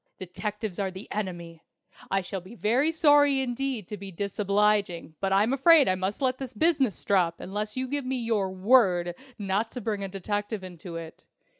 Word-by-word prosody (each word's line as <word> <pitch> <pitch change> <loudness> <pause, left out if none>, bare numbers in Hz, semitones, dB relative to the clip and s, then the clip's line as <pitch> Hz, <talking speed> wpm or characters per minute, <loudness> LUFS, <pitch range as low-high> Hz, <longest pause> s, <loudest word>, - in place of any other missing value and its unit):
Detectives 205 +2 -5
are 195 -1 0
the 190 +2 -9
Enemy! 175 -5 -5 0.5
I 195 0 +1
shall 190 +1 -5
be 185 +7 -13
very 245 +9 +2
sorry 290 -4 +4
indeed 255 -4 -2
to 210 - -5
be 195 0 -8
disobliging, 200 -2 0
but 195 -1 -1
I'm 205 +6 +3
afraid 295 +2 +6
I 185 - +3
must 190 +7 -3
let 255 0 +1
this 260 -2 -6
business 275 - +1
drop 175 -4 +1
unless 210 +4 -4
you 260 0 -1
give 285 +2 -2
me 260 0 0
your 225 -5 0
word 185 -4 +3 0.2
not 205 +2 -1
to 250 - -4
bring 210 -3 -3
a - - -2
detective 205 +2 -3
into 175 -1 -9
it. 165 -1 -8
205 Hz, 180 wpm, -27 LUFS, 190-250 Hz, 0.5 s, afraid